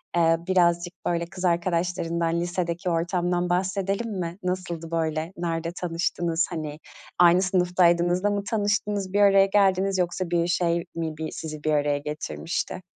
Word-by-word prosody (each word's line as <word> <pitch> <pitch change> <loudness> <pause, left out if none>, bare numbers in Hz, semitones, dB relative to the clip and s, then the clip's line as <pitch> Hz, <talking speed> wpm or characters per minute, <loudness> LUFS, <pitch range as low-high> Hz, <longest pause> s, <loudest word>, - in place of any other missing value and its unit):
eee, 165 -1 +4
birazcık, 175 -1 +2
böyle, 170 -1 0
kız 180 +2 -6
arkadaşlarından, 170 -1 0
lisedeki 175 +1 -2
ortamdan 175 +1 0
bahsedelim 195 +4 -1
mi? 170 +1 -4
Nasıldı, 175 -3 -3
böyle? 160 +1 -1
Nerede 165 -1 -2
tanıştınız, 170 -1 -1
hani, 155 -3 -5 0.4
aynı 175 +1 +6
sınıftaydınız 180 -1 +2
da 205 - +3
mı 200 -1 -1
tanıştınız, 205 -2 -1
bir 205 - +3
araya 195 -1 +6
geldiniz, 195 -1 +2
yoksa 180 0 -1
bir 170 0 +2
şey 170 -1 +1
mi 160 -2 -3
bi 160 0 -4
sizi 155 -2 -7
bir 155 - +1
araya 145 -1 +2
getirmişti? 145 - -4
175 Hz, 145 wpm, -25 LUFS, 165-185 Hz, 0.4 s, aynı